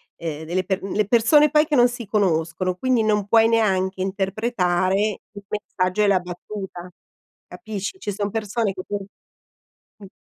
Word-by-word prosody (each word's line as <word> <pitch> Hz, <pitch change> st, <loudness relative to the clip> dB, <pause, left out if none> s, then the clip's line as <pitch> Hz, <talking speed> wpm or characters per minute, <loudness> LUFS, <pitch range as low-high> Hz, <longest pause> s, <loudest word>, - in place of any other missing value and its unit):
ehm 160 Hz, -1 st, -6 dB
delle 180 Hz, +3 st, -1 dB
per 190 Hz, 0 st, -2 dB
le 205 Hz, +2 st, -1 dB
persone 250 Hz, +8 st, +5 dB
poi 300 Hz, 0 st, +4 dB
che 300 Hz, -, 0 dB
non 245 Hz, -2 st, +5 dB
si 240 Hz, -1 st, -7 dB
conoscono, 185 Hz, -3 st, 0 dB
quindi 245 Hz, +3 st, +1 dB
non 210 Hz, -2 st, +1 dB
puoi 225 Hz, +1 st, +5 dB
neanche 190 Hz, -4 st, +1 dB
interpretare 190 Hz, -1 st, 0 dB, 0.3 s
il 205 Hz, -1 st, -12 dB
messaggio 200 Hz, -1 st, -1 dB
e -, -, +3 dB
la 195 Hz, -2 st, +4 dB
battuta, 180 Hz, 0 st, -8 dB, 0.6 s
capisci. 205 Hz, -, -6 dB
Ci -, -, -3 dB
sono 205 Hz, +1 st, -3 dB
persone 215 Hz, 0 st, -1 dB
che 185 Hz, -, -7 dB
tu 205 Hz, -, -3 dB, 1.0 s
Mh. 200 Hz, -3 st, -12 dB
200 Hz, 160 wpm, -22 LUFS, 185-220 Hz, 1.0 s, persone